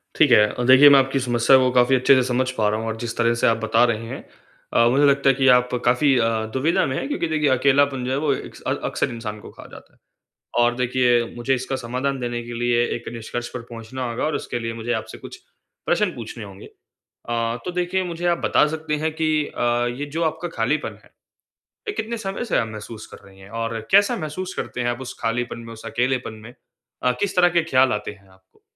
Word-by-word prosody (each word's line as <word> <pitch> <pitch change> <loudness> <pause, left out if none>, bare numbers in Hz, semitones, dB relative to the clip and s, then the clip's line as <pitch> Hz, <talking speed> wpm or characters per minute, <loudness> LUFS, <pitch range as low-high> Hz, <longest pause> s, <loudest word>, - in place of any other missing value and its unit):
ठीक 150 -5 +4
है। 115 - +8
अ, 125 - -3
देखिए 135 +3 +9
मैं 140 - +7
आपकी 135 0 0
समस्या 120 0 +4
को 130 -1 +3
काफ़ी 125 +1 +4
अच्छे 130 +1 +5
से 130 - +3
समझ 130 +1 0
पा 110 -5 0
रहा 110 +1 -1
हूँ 115 - -4
और 110 - -2
जिस 115 -1 -4
तरह 115 0 +2
से - - +4
आप 115 - +3
बता 110 +1 +2
रहे 115 0 -5
हैं - - -7 0.5
अ, 115 - +4
मुझे 140 +4 +3
लगता 140 -1 +3
है 135 - +3
कि 135 0 +1
आप 125 0 -2 0.2
काफ़ी 130 +3 +3
अ, 115 -1 +2 0.3
दुविधा 145 +6 +1
में 130 - -2
हैं - - -3
क्योंकि 285 - -2
देखिए 150 -2 +1
अकेलापन 135 0 +2
जो 130 - -2
है 135 - 0
वो 145 0 0
एक्स - - -8
अक्सर - - -1
इंसान 115 -3 -6
को - - -12
खा - - -13
जाता - - -14
है। - - -31 0.6
और 120 0 +2
देखिए 125 -1 +2
मुझे 125 +2 0
इसका 130 +1 -3
समाधान 130 +2 -3
देने 120 -1 -3
के 120 - -8
लिए 120 0 +2
एक 120 - -9
निष्कर्ष 120 +1 -5
पर 125 - -5
पहुँचना 120 +2 -6
होगा 115 - -3
और 155 - -1
इसके 120 - -4
लिए 115 0 -4
मुझे 115 +1 -4
आपसे 110 - -5
कुछ - - -10 0.5
प्रश्न 180 +1 +1
पूछने 115 -1 -8
होंगे। 100 -1 -11 0.4
अ, 115 0 -3
तो - - -3
देखिए 180 +1 -1
मुझे 175 0 -4
आप 170 -1 +2
बता - - +3
सकते 155 -1 -3
हैं 160 - 0
कि 160 0 -1 0.2
अ, 120 0 0
ये 145 - -3
जो 170 - 0
आपका 160 +2 -2
खालीपन 130 +7 -1
है, - - -22 0.8
ये 415 - -2
कितने 235 - -4
समय 195 +2 -4
से 230 - 0
आप 115 - 0
महसूस 110 0 -9
कर - - -13
रही 95 0 -18
हैं? 95 +1 -14
और 115 0 -3
कैसा 200 +1 +5
महसूस 180 +5 -5
करते 125 - -4
हैं 120 - 0
आप 120 +2 -4
उस 130 - -7
खालीपन 120 +1 -2
में, 115 0 -9
उस 110 - -12
अकेलेपन 125 -2 -1
में? 120 - -11 0.5
अ, 125 - +3
किस 200 -1 -1
तरह 175 -1 +5
के - - 0
ख़्याल 130 -4 +3
आते 105 0 -4
हैं 100 -1 -18
आपको? 95 0 -26
125 Hz, 235 wpm, -22 LUFS, 115-145 Hz, 0.8 s, देखिए